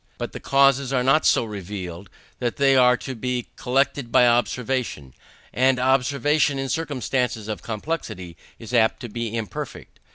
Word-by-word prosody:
But - - -5
the - - -7
causes 135 -1 +3
are 130 -2 +1
not 135 +5 +3
so - - +4
revealed: 95 -3 -7 0.3
they 135 +3 +2
are 125 -1 +5
to 135 - -6
be 125 0 -3
collected 135 -1 0
by 125 - +6
observation; 120 - -1 0.4
and 130 0 +3
observation 140 +3 +2
in 135 0 -3
circumstances 130 -7 -2
of 110 -1 -4
complexity 110 - -5 0.2
is 115 +1 -10
apt 110 -1 +3
to 120 - -6
be 115 +1 -4
imperfect. 110 -2 -7
125 Hz, 150 wpm, -23 LUFS, 110-135 Hz, 0.4 s, by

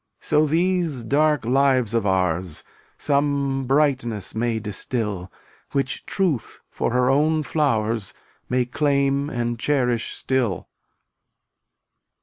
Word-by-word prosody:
So 155 +1 +2
these 170 -4 +1
dark 150 +2 +2
lives 130 -3 +2
of 115 -3 +1
ours 90 -3 0 0.3
Some 140 -2 0
brightness 130 -7 +1
may 115 0 0
distil, 105 -3 -3 0.4
Which 135 -1 -1
Truth 175 - -1
for - - -1
her 125 +1 +3
own 155 +3 +2
flowers 115 -9 0 0.3
May 125 0 +1
claim 140 +1 +1
and 120 -3 -2
cherish 125 -5 0
still. 125 -9 -1
130 Hz, 105 wpm, -23 LUFS, 115-145 Hz, 0.4 s, her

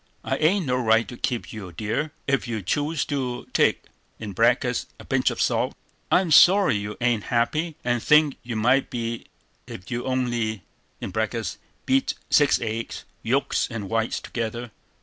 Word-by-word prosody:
] - - -39
"I - - +1
ain't 180 +4 +2
no 125 -2 +1
right 115 -2 +3
to 120 - -7
keep 120 -1 -3
you, 100 -5 -7
dear, 110 - -2 0.2
ef 140 -2 +1
you 110 -4 -3
choose 145 - 0
to 125 -4 -3
take - - +3 0.4
(a 115 +4 +1 0.2
pinch - - +2
of - - -5
salt). - - +1 0.4
I'm 180 -2 +3
sorry 185 - +7
you 105 +1 -4
ain't 120 -4 +1
happy, 150 +7 0
and 120 -1 0
think 150 0 +4
you 120 -1 -5
might 125 +5 +2
be 115 -1 -4 0.4
ef 90 +4 -9
you'd 120 +1 -3
only 120 -5 -1 1.2
(beat 270 0 +2 0.2
six 145 -2 +5
eggs, 115 0 -4 0.2
yolks 130 +4 +1
and 110 -5 -6
whites 115 0 0
together). 115 0 -4
120 Hz, 150 wpm, -24 LUFS, 115-140 Hz, 1.2 s, sorry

